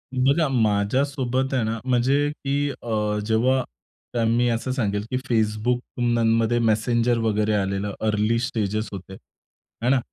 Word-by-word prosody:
बघा 140 Hz, +5 st, +3 dB
माझ्यासोबत 130 Hz, +4 st, 0 dB
आहे 125 Hz, -4 st, +1 dB
ना, 115 Hz, +1 st, -2 dB
म्हणजे 130 Hz, +4 st, +2 dB
की 145 Hz, 0 st, -2 dB
अ, 105 Hz, -5 st, -2 dB
जेव्हा 125 Hz, +4 st, +2 dB, 0.6 s
मी 120 Hz, +2 st, +2 dB
असं 115 Hz, +3 st, -1 dB
सांगेल 105 Hz, -5 st, -1 dB
की 125 Hz, -, 0 dB
Facebookमध्ये 115 Hz, +1 st, +1 dB
मेसेंजर 115 Hz, +1 st, +2 dB
वगैरे 110 Hz, -1 st, +1 dB
आलेलं 100 Hz, 0 st, -1 dB
अर्ली 110 Hz, +1 st, +1 dB
स्टेजेस 110 Hz, -3 st, -2 dB
होते 95 Hz, -1 st, -8 dB
आहे 115 Hz, +4 st, -9 dB
ना, 135 Hz, -, +4 dB
115 Hz, 125 wpm, -23 LUFS, 105-130 Hz, 0.6 s, ना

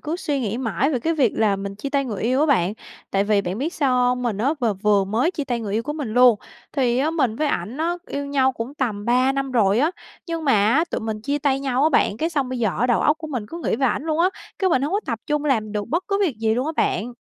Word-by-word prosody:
cứ 315 Hz, +3 st, -3 dB
suy 295 Hz, -6 st, -2 dB
nghĩ 225 Hz, 0 st, -2 dB
mãi 230 Hz, -, 0 dB
về 265 Hz, -, 0 dB
cái 330 Hz, +6 st, 0 dB
việc 270 Hz, -8 st, +2 dB
là 210 Hz, -3 st, +2 dB
mình 195 Hz, 0 st, -5 dB
chia 275 Hz, +8 st, -6 dB
tay 275 Hz, -1 st, +1 dB
người 215 Hz, -7 st, -4 dB
yêu 255 Hz, +4 st, +1 dB
á 305 Hz, -, +3 dB
bạn. 200 Hz, -, +2 dB, 0.4 s
Tại 195 Hz, 0 st, +1 dB
vì 205 Hz, -1 st, +2 dB
bạn 185 Hz, +3 st, -4 dB
biết 310 Hz, +7 st, -2 dB
sao 275 Hz, -6 st, +1 dB
hông? 250 Hz, 0 st, +2 dB
Mình 230 Hz, -5 st, -1 dB
á 270 Hz, +8 st, +1 dB
v -, -, -1 dB, 0.2 s
vừa 205 Hz, -2 st, +3 dB
mới 225 Hz, -, +1 dB
chia 300 Hz, -6 st, -4 dB
tay 245 Hz, -3 st, -2 dB
người 210 Hz, -3 st, -4 dB
yêu 220 Hz, +2 st, 0 dB
của 295 Hz, -, -4 dB
mình 295 Hz, -5 st, -4 dB
luôn. 245 Hz, -3 st, +6 dB, 0.3 s
Thì 250 Hz, -4 st, +1 dB
á, 295 Hz, +4 st, +1 dB
mình 260 Hz, -9 st, 0 dB
với 305 Hz, -, 0 dB
ảnh 210 Hz, +1 st, -3 dB
á, 330 Hz, +3 st, 0 dB
yêu 285 Hz, 0 st, -4 dB
nhau 270 Hz, -2 st, +2 dB
cũng 240 Hz, +3 st, -6 dB
tầm 220 Hz, -8 st, -2 dB
3 255 Hz, +3 st, +3 dB
năm 275 Hz, 0 st, -2 dB
rồi 215 Hz, -3 st, +3 dB
á, 300 Hz, +5 st, +3 dB, 0.4 s
nhưng 330 Hz, -2 st, -3 dB
mà 275 Hz, -, +3 dB
á, 225 Hz, +10 st, +3 dB
tụi -, -, -2 dB
mình 220 Hz, -1 st, -4 dB
chia 285 Hz, +6 st, -1 dB
tay 275 Hz, -2 st, +1 dB
nhau 265 Hz, -1 st, 0 dB
á 310 Hz, -, +5 dB
bạn, 255 Hz, -8 st, +2 dB
cái 320 Hz, +8 st, -1 dB
xong 280 Hz, -5 st, -1 dB
bây 255 Hz, -1 st, -3 dB
giờ 225 Hz, -2 st, +2 dB
á 245 Hz, -, +3 dB
đầu 240 Hz, -, +2 dB
óc 300 Hz, +1 st, +2 dB
của 325 Hz, -, -6 dB
mình 250 Hz, -8 st, -4 dB
cứ 335 Hz, -, -7 dB
nghĩ -, -, +1 dB
về 265 Hz, +2 st, +2 dB
ảnh 260 Hz, -, -1 dB
luôn 315 Hz, 0 st, -1 dB
á, 350 Hz, +2 st, +4 dB, 0.3 s
cái 380 Hz, -1 st, +2 dB
mình 260 Hz, -5 st, +2 dB
hông 295 Hz, +5 st, -1 dB
có 405 Hz, -, +1 dB
tập 230 Hz, -4 st, -2 dB
trung 295 Hz, 0 st, 0 dB
làm 220 Hz, -7 st, 0 dB
được 205 Hz, -1 st, -3 dB
bất 340 Hz, +4 st, -1 dB
cứ 395 Hz, -1 st, +1 dB
việc 335 Hz, -, +1 dB
gì 220 Hz, 0 st, +1 dB
luôn 250 Hz, +4 st, -1 dB
á 315 Hz, -, -2 dB
bạn. 240 Hz, +4 st, 0 dB
255 Hz, 305 wpm, -22 LUFS, 220-295 Hz, 0.4 s, luôn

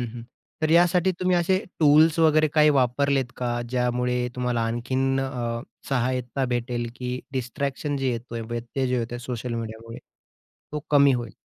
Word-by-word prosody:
हं, 120 Hz, -, -2 dB
हं. 120 Hz, -, -7 dB, 0.4 s
तर 155 Hz, -, +2 dB
यासाठी 175 Hz, +2 st, +4 dB
तुम्ही 185 Hz, -1 st, +2 dB
असे 175 Hz, +2 st, +2 dB, 0.2 s
टूल्स 155 Hz, +2 st, +5 dB
वगैरे 155 Hz, -1 st, +4 dB
काही 150 Hz, -1 st, +6 dB
वापरलेत 130 Hz, 0 st, +1 dB
का? 120 Hz, -1 st, -2 dB
ज्यामुळे 125 Hz, 0 st, 0 dB
तुम्हाला 125 Hz, -2 st, 0 dB
आणखीन 130 Hz, +3 st, 0 dB
अ, 120 Hz, -3 st, -3 dB, 0.3 s
सहायता, 130 Hz, 0 st, -1 dB
भेटेल 120 Hz, -1 st, -2 dB
की 125 Hz, 0 st, -4 dB
डिस्ट्रॅक्शन 135 Hz, +3 st, -3 dB
जे 135 Hz, -2 st, 0 dB
येतोय 115 Hz, 0 st, -5 dB
व्यत्यय 120 Hz, +3 st, -3 dB
जे 125 Hz, 0 st, 0 dB
येतोय 120 Hz, +1 st, -4 dB
सोशल 125 Hz, -1 st, -5 dB
मीडियामुळे 115 Hz, 0 st, -6 dB, 0.7 s
तो 150 Hz, -, -2 dB
कमी 140 Hz, -2 st, +6 dB
होईल. 120 Hz, -3 st, -4 dB
125 Hz, 150 wpm, -25 LUFS, 120-140 Hz, 0.7 s, काही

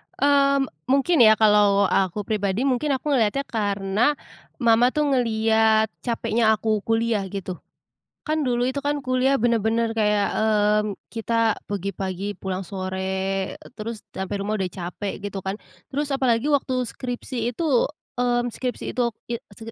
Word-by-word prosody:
Mmm, 280 Hz, -1 st, +3 dB, 0.2 s
mungkin 280 Hz, +6 st, +3 dB
ya 220 Hz, 0 st, +7 dB
kalau 205 Hz, -2 st, +4 dB
aku 195 Hz, +2 st, +1 dB
pribadi, 205 Hz, +2 st, -1 dB
mungkin 275 Hz, +1 st, +1 dB
aku 295 Hz, +3 st, -3 dB
ngeliatnya 260 Hz, +1 st, +2 dB
karena, 205 Hz, +3 st, 0 dB, 0.5 s
mama 235 Hz, +1 st, +5 dB
tuh 300 Hz, -, +2 dB
ngelihat 220 Hz, -3 st, +3 dB
capeknya 230 Hz, -2 st, +1 dB
aku 215 Hz, 0 st, 0 dB
kuliah, 225 Hz, -3 st, +1 dB
gitu. 185 Hz, -2 st, -6 dB, 0.7 s
Kan 310 Hz, 0 st, 0 dB
dulu 245 Hz, 0 st, +1 dB
itu 260 Hz, +2 st, -2 dB
kan 290 Hz, 0 st, 0 dB
kuliah 260 Hz, +1 st, +1 dB
benar-benar 230 Hz, 0 st, +1 dB
kayak, 210 Hz, -2 st, +2 dB
eee, 210 Hz, -1 st, +3 dB, 0.3 s
kita 230 Hz, -1 st, +1 dB
pergi 200 Hz, -1 st, -3 dB
pagi 190 Hz, 0 st, -4 dB
pulang 190 Hz, 0 st, -4 dB
sore, 190 Hz, 0 st, -3 dB, 0.2 s
terus 220 Hz, 0 st, -5 dB
sampai 190 Hz, +1 st, -4 dB
rumah 215 Hz, +1 st, -2 dB
udah 190 Hz, -, 0 dB
capek, 185 Hz, +3 st, -6 dB
gitu 200 Hz, -1 st, -4 dB
kan. 190 Hz, +1 st, -3 dB, 0.3 s
Terus 290 Hz, +1 st, -3 dB
apalagi 265 Hz, 0 st, +1 dB
waktu 260 Hz, -3 st, +1 dB
skripsi 245 Hz, -1 st, -4 dB
itu, 295 Hz, -6 st, +2 dB, 0.3 s
eee, 245 Hz, -1 st, +2 dB
skripsi 250 Hz, +2 st, -4 dB
itu, 240 Hz, -2 st, 0 dB, 0.2 s
i 235 Hz, -, -2 dB, 0.2 s
skip 225 Hz, +2 st, -9 dB
225 Hz, 145 wpm, -23 LUFS, 200-255 Hz, 0.7 s, ya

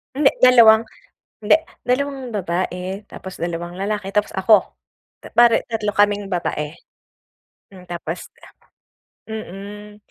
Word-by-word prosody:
Hindi, 280 Hz, 0 st, +5 dB, 0.2 s
2, 230 Hz, -3 st, +7 dB, 0.6 s
hindi 210 Hz, +8 st, +5 dB, 0.3 s
2 265 Hz, 0 st, -1 dB
babae 185 Hz, 0 st, -3 dB
tapos 190 Hz, -1 st, -9 dB
2 170 Hz, 0 st, -4 dB
lalaki 195 Hz, +1 st, -3 dB
tapos 210 Hz, 0 st, +1 dB
ako. 195 Hz, +1 st, +3 dB, 0.6 s
Bale 235 Hz, -1 st, +5 dB
3 220 Hz, -3 st, -2 dB
kaming 205 Hz, -1 st, +1 dB
babae. 150 Hz, -4 st, -2 dB, 1.0 s
Hmm, 185 Hz, -2 st, -14 dB
tapos 175 Hz, 0 st, -6 dB, 1.0 s
Mm. 210 Hz, 0 st, -8 dB
205 Hz, 100 wpm, -20 LUFS, 180-220 Hz, 1.0 s, 2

